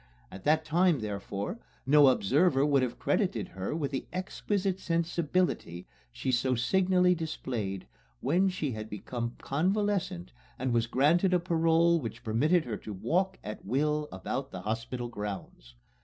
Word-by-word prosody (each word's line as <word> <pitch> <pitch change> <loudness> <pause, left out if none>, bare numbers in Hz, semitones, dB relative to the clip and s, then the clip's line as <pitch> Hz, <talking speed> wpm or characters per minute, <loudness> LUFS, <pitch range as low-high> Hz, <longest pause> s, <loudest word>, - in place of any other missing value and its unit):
At 95 - -10
that 155 +1 +3
time, 170 -3 +3
therefore, 100 - -4 0.3
no 145 +1 +7
observer 135 - +3
would 140 -2 +3
have 125 -2 -2
credited - - 0
her 95 +9 -4
with 145 -4 -2
the 135 - -3
exquisite 190 +1 -2
sensibility 170 - -1 0.3
she 130 - -2
so 130 +1 +2
signally 180 +7 +3
displayed 120 - -4 0.3
when 190 +2 +2
she 155 -7 -2
had 110 -1 -6
become 120 +3 -4
convalescent 185 - -1 0.2
and 130 -1 -1
was 115 -1 +2
granted 170 - +3
a - - +3
parole 165 -1 +3
which 120 -2 -6
permitted 145 +10 +2
her 110 -4 -3
to 105 - -8
walk 185 - 0
at 105 - -7
will 150 +6 0
about 130 +8 -4
the - - -7
hospital 115 +3 -3
grounds. 100 - -7
140 Hz, 145 wpm, -30 LUFS, 115-175 Hz, 0.3 s, no